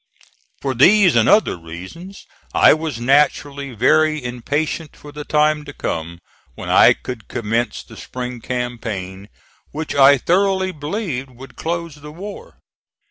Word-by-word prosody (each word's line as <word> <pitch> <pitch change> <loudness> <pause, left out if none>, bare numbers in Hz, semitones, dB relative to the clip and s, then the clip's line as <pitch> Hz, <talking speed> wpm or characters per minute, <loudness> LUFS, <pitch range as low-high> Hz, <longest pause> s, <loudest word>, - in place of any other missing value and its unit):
For 135 -1 -1
these 180 - +5
and 115 -2 +4
other 215 - +4
reasons 95 - -10 0.3
I - - +7
was 155 -6 -4
naturally 140 +1 +1
very 155 +5 +2
impatient 145 +6 -3
for 145 - -13
the 150 0 -7
time 150 0 +1
to 145 - -9
come 85 -3 -5 0.3
when - - -7
I - - +7
could 125 -4 -8
commence 115 +1 -2
the - - -15
spring 125 -1 -7
campaign, 110 -6 -5 0.4
which 155 +1 -5
I 140 0 +6
thoroughly 190 +5 +1
believed 150 - -4
would 130 +2 -14
close 170 -1 -4
the 150 +1 -11
war. 205 - -10
140 Hz, 135 wpm, -19 LUFS, 120-160 Hz, 0.4 s, I